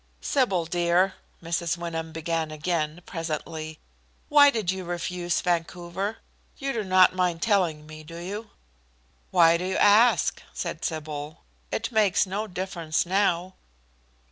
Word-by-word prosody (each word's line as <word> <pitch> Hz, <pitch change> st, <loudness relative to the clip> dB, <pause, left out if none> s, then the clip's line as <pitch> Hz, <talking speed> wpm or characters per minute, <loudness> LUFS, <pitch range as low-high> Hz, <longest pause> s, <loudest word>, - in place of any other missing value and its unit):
"Sybil, 195 Hz, -, +1 dB
dear," 175 Hz, +3 st, +2 dB, 0.3 s
Mrs. 170 Hz, 0 st, -1 dB
Wyndham 165 Hz, -1 st, -4 dB
began 160 Hz, 0 st, -2 dB
again, 155 Hz, +1 st, -2 dB
presently, 160 Hz, -2 st, -5 dB, 0.5 s
"why 290 Hz, -1 st, +8 dB
did 220 Hz, -9 st, 0 dB
you 190 Hz, 0 st, -5 dB
refuse 175 Hz, 0 st, -2 dB
Vancouver? 175 Hz, +3 st, -2 dB, 0.4 s
You 275 Hz, 0 st, -2 dB
do 220 Hz, -, -2 dB
not 185 Hz, -1 st, +5 dB
mind 180 Hz, -2 st, 0 dB
telling 175 Hz, -8 st, +1 dB
me, 155 Hz, 0 st, -10 dB
do 165 Hz, +2 st, -10 dB
you?" 205 Hz, +5 st, -6 dB, 0.8 s
"Why 165 Hz, -, +5 dB
do 175 Hz, -, -5 dB
you 190 Hz, 0 st, -1 dB
ask?" 215 Hz, +4 st, +4 dB
said -, -, -5 dB
Sybil. 155 Hz, -1 st, -5 dB, 0.3 s
"It 230 Hz, +3 st, -2 dB
makes 210 Hz, -5 st, +3 dB
no 200 Hz, +3 st, -3 dB
difference 180 Hz, -4 st, -2 dB
now." 185 Hz, -1 st, +1 dB
175 Hz, 130 wpm, -26 LUFS, 165-195 Hz, 0.8 s, why